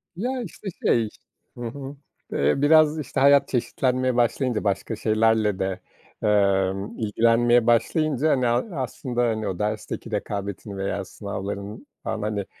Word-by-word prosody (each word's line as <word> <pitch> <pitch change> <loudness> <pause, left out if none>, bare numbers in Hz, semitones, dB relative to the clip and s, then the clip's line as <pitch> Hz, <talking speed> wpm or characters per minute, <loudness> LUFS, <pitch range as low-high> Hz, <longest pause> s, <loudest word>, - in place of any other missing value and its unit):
Ya, 250 +7 -2
işte, 205 -1 -9 0.2
şey 115 -3 +3 0.5
Hı 120 - -8
hı, 135 +3 -7 0.4
ııı, 70 - +2
biraz 155 +1 +5
işte 140 - -3
hayat 140 +1 +6
çeşitlenmeye 130 0 0
başlayınca, 120 0 +1
başka 100 +3 -1
şeylerle 110 -2 +2
de, 95 -1 -2 0.4
emm, 100 -1 +1
ilgilenmeye 115 +2 +3
başlayınca 150 +5 +2
hani 130 -3 +2
a 135 - -1
aslında, 125 -1 -3
hani, 110 -3 0
o 95 -2 -4
dersteki 110 +2 -3
rekabetin 100 -1 -4
veya 95 0 -2
sınavların 100 +3 -6 0.2
falan 110 - -3
hani, 105 -1 -2
115 Hz, 135 wpm, -24 LUFS, 105-130 Hz, 0.5 s, hayat